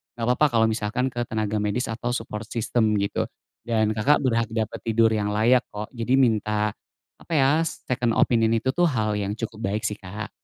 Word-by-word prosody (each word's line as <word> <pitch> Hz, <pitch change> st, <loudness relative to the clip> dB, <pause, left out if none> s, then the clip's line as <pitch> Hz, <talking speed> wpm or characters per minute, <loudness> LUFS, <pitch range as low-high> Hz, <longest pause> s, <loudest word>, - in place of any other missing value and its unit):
gak 115 Hz, -, -5 dB
apa-apa 125 Hz, +5 st, +4 dB
kalo -, -, +5 dB
misalkan 110 Hz, +4 st, -1 dB
ke 120 Hz, 0 st, -2 dB
tenaga 110 Hz, -1 st, -1 dB
medis 105 Hz, +4 st, -1 dB
atau 120 Hz, +2 st, -3 dB
support 115 Hz, -1 st, -5 dB
system, 110 Hz, -1 st, 0 dB
gitu. 100 Hz, -, -1 dB, 0.4 s
Dan, 110 Hz, -2 st, +1 dB
Kakak, 140 Hz, +8 st, +3 dB
berhak 115 Hz, -3 st, +1 dB
dapet 110 Hz, 0 st, -2 dB
tidur 115 Hz, 0 st, +3 dB
yang 105 Hz, -1 st, 0 dB
layak 120 Hz, +4 st, +4 dB
kok. 105 Hz, +1 st, -5 dB
Jadi 120 Hz, +3 st, +1 dB
minta, 105 Hz, -3 st, +2 dB, 0.5 s
apa -, -, -16 dB
ya, 145 Hz, +3 st, +4 dB
second 125 Hz, -7 st, -2 dB
opinion 115 Hz, -2 st, +3 dB
itu 130 Hz, +4 st, 0 dB
tuh, 175 Hz, 0 st, +4 dB
hal 110 Hz, -7 st, 0 dB
yang 100 Hz, -1 st, -2 dB
cukup 110 Hz, -1 st, -6 dB
baik 110 Hz, +1 st, -2 dB
sih, 105 Hz, -, -3 dB
Kak. 105 Hz, +3 st, -7 dB
115 Hz, 190 wpm, -24 LUFS, 105-125 Hz, 0.5 s, kalo